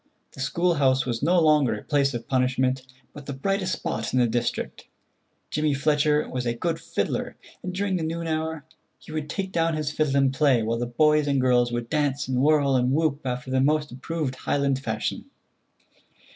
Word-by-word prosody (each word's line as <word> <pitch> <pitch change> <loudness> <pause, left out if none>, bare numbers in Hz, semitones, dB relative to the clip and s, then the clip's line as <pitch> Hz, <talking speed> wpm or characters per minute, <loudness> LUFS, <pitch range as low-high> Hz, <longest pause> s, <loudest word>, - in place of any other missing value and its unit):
The - - -14
school 170 +6 +1
house 135 -4 +2
was 120 -3 -2
no 175 +4 +3
longer 150 -7 +4
a 105 - -8
place 140 -3 +1
of 115 -1 -6
punishment, 130 0 +1 0.3
but 145 -1 -11
the 140 - -3
brightest 185 +6 -1
spot 110 +1 -3
in - - +4
the 125 - +4
district. 120 +1 -2 0.6
Jimmy 150 -2 +1
Fletcher 150 +1 +2
was 125 -1 -3
a 120 - 0
good 165 +6 -2
fiddler, - - -3 0.3
and 185 - -4
during 190 0 -1
the 165 - -3
noon 165 +1 -3
hour 160 -1 -2 0.3
he - - -14
would 155 -1 -4
take 190 +2 -3
down 165 -2 +1
his 155 -1 -2
fiddle 150 -2 0
and 135 -1 +3
play, 135 -5 +3
while 115 +1 -1
the 120 - -2
boys 150 +4 +3
and 140 -1 +2
girls 125 -1 +3
would 120 -1 -3
dance 145 -1 0
and 130 -1 0
whirl 145 -2 +3
and 125 +1 +2
whoop 155 -1 +1
after 125 0 -4
the 130 0 +2
most 150 +2 +1
approved 140 +2 -3
Highland 140 -2 0
fashion. 135 - -3
140 Hz, 195 wpm, -25 LUFS, 130-155 Hz, 0.6 s, longer